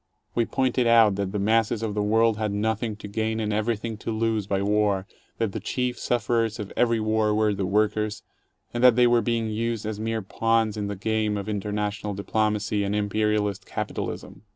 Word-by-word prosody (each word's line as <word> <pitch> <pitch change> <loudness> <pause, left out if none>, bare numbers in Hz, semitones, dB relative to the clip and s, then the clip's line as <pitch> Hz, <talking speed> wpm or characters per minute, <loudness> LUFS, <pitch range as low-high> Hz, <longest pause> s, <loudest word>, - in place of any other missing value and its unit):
We 120 - +1
pointed 130 -2 +1
out 115 -3 +6
that 100 -1 -2
the 105 - -2
masses 110 +2 +1
of 110 -2 -2
the 105 - -1
world 110 +1 +3
had 110 -1 -1
nothing 110 +2 -1
to 105 - -9
gain 110 +2 -2
and 105 -1 -1
everything 110 +1 -1
to 110 - -6
lose 110 -2 0
by 100 -1 0
war; 100 -2 +1 0.3
that 115 -3 0
the - - -4
chief 125 -1 -2
sufferers 115 -2 0
of 105 -3 -6
every 115 -2 +2
war 110 -1 +1
were 105 -1 +2
the 95 -1 -2
workers, 105 +1 0 0.5
and 120 +1 -1
that 125 -2 +7
they 125 0 +5
were 120 -1 +4
being 115 0 -1
used 115 0 -2
as 105 -1 -4
mere 110 -1 -2
pawns 115 +2 +1
in 105 -1 -3
the 100 - -3
game 110 +1 0
of 100 0 -5
international 105 0 -2
diplomacy 105 0 0
and 100 +1 -1
imperialist 105 -1 0
capitalism. - - -5
110 Hz, 195 wpm, -25 LUFS, 105-115 Hz, 0.5 s, that